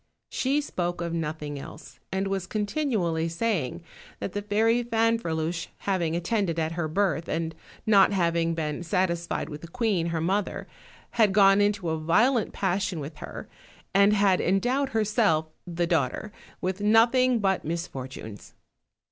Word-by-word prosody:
She 275 +3 0
spoke 175 -11 -3
of 170 -1 -3
nothing 150 -3 -3
else, 150 - -11
and 190 +1 -1
was 195 -1 -2
continually 205 - -1
saying 170 - -2 0.4
that 195 - -4
the 205 - -2
fairy 220 +3 +2
Fanferluche 200 -9 0
having 175 -5 -1
attended 175 -1 0
at 160 -1 0
her 165 -1 -2
birth, 170 0 0
and 165 0 -2 0.3
not 205 -3 +6
having 170 -3 +1
been 155 -1 -3
satisfied 170 -1 -1
with 150 -1 -8
the 170 - -9
queen 200 -4 0
her 165 -1 -1
mother, 190 +5 -1 0.5
had 205 -3 +5
gone 195 0 +6
into 205 -4 +1
a 160 - -1
violent 215 +9 +2
passion 190 -2 -1
with 150 +1 -7
her, - - -8 0.5
and 200 +1 +5
had 200 -3 +3
en 190 +2 +2
dowed 265 +6 0
herself, 210 -8 +1 0.2
the 175 0 -1
daughter, 165 +4 -1 0.3
with 185 +2 -2
nothing 235 +4 +4
but 195 -3 +1
misfor 160 -5 -4
tunes. 110 -6 -10
185 Hz, 150 wpm, -26 LUFS, 165-210 Hz, 0.5 s, not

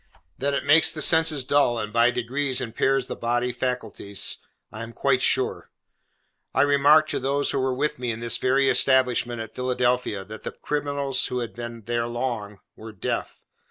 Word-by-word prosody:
That 140 +1 0
it - - -3
makes 150 +3 +6
the 155 - -5
senses 160 -5 +5
dull, 140 -4 +2
and 105 -1 -5
by 115 +1 +4
degrees 130 +2 -2
impairs 130 +3 0
the - - -6
bodily 120 +1 -1
faculties, 120 -5 -2 0.3
I 110 - -8
am 115 0 -8
quite 130 0 +1
sure. - - 0 0.9
I - - +4
remarked 145 +2 +4
to - - -2
those 140 +2 0
who 140 - -1
were 130 -1 -1
with 150 +3 -2
me 125 -1 -3
in 110 -1 -3
this 115 0 0
very 135 +1 +2
establishment 125 -3 +2
at 110 -1 -9
Philadelphia, 125 -5 -1
that 110 +2 -10
the - - -5
criminals 140 -2 -2
who 125 - -4
had 120 -2 -4
been 120 -1 -8
there 120 +1 -2
long, 120 -4 -4
were 110 +1 -10
deaf. 95 - -4
125 Hz, 180 wpm, -24 LUFS, 115-140 Hz, 0.9 s, makes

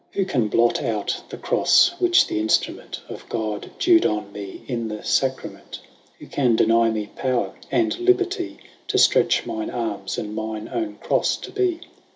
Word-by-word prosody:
Who 195 - 0
can 125 - 0
blot 115 +3 +2
out 110 -6 -2
the - - -7
Crofle, 365 - +4
which 355 -1 +5
th'inftrument 110 +1 -1
15 - - -6
Of - - -15
God, 110 -3 -3
dew'd 345 -1 +5
on 105 -1 -1
mee 100 -2 -8
in 115 -3 -2
the 105 -1 -6
Sacrament? 130 -1 -2 0.4
Who - - -12
can 125 -5 +1
deny 115 +1 +4
mee 105 -2 -3
power, 130 -2 -1 0.2
and 335 +1 +1
liberty 370 0 +1 0.3
To - - 0
ftretch - - +4
mine 330 -1 -4
armes, 105 -5 -3
and 105 0 -4
mine 110 0 -5
owne 330 -2 -3
CroiTe - - +1
to - - -7
be? 370 -4 0
120 Hz, 170 wpm, -23 LUFS, -, 0.4 s, which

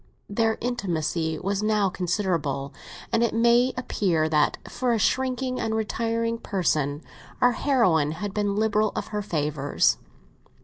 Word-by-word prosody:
Their 225 +2 +1
intimacy 170 -9 -1
was 195 +3 -2
now 215 -2 +2
considerable, 165 -8 -1 0.4
and 230 - +3
it 235 -2 +1
may 235 +2 +4
appear 180 -10 0
that 150 -1 +2
for 250 -2 -1
a - - +2
shrinking 255 +3 0
and 220 -1 -1
retiring 230 +1 -1
person 150 -8 -1 0.4
our 245 - +5
heroine 185 - +2
had 195 +4 -5
been 205 -1 0
liberal 215 0 +2
of - - -4
her 210 -1 -2
favours. 150 -6 0
205 Hz, 135 wpm, -25 LUFS, 160-230 Hz, 0.4 s, our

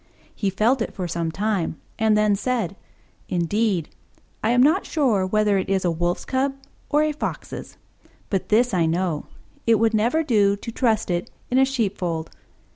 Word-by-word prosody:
He 200 - -1
felt 225 +7 +2
it - - -3
for 185 -2 -3
some 170 -1 -2
time, 195 -4 -1 0.2
and 220 -1 +3
then 210 -1 +3
said, 215 -4 -1 0.5
"Indeed, 180 0 0 0.5
I 220 - +2
am 245 +1 +5
not 320 +8 +4
sure 230 - +1
whether 210 0 +2
it 190 - -3
is 190 -1 +1
a 175 - +3
Wolf's 175 +2 -1
Cub 270 +1 0 0.3
or 295 +1 +3
a 305 - +1
Fox's: 300 - -6 0.5
but 195 -3 -1
this 235 +2 +3
I 170 -3 +2
know 170 -2 -1 0.4
it 230 - +6
would 225 +1 +2
never 235 +10 +2
do 205 -8 +3
to 215 +3 -7
trust 225 -5 +1
it 175 0 -2 0.2
in 255 - +4
a 265 - +6
sheepfold." 190 -10 -2
210 Hz, 175 wpm, -23 LUFS, 185-240 Hz, 0.5 s, it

